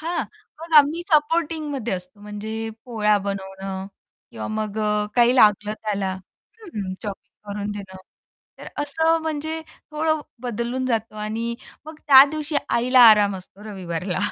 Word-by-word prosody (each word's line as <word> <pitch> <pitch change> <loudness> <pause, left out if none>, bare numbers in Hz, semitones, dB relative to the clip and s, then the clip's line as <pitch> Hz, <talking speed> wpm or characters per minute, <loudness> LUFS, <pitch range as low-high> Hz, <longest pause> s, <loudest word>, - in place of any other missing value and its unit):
हां, 335 +2 -2 0.4
मग 330 0 -9
आम्ही 300 +4 +3
सपोर्टिंगमध्ये 300 - +1
असतो, 180 +3 -9
म्हणजे 210 +1 -6 0.3
पोळ्या 210 -4 +2
बनवणं 195 -1 -5 0.4
किंवा - - -6
मग 215 -1 -3
अ, 210 -1 +1
काही 240 +1 +5
लागलं 210 -2 +4
त्याला 200 -3 -1 0.5
हं 210 - -5
चॉपिंग 205 0 -9
करून 205 0 -4
देणं 195 -2 -8 0.6
तर - - -9
असं 320 +3 +1
म्हणजे 315 0 -3 0.3
थोडं 315 0 0 0.2
बदलून 245 +2 -3
जातो 225 -3 -2
आणि 220 +2 -3 0.3
मग 315 0 -10
त्या 270 -2 +10
दिवशी 305 -1 -3
आईला 250 +2 +3
आराम 205 -2 +4
असतो 190 +2 -13
रविवारला. 185 -3 -4
220 Hz, 135 wpm, -23 LUFS, 205-295 Hz, 0.6 s, त्या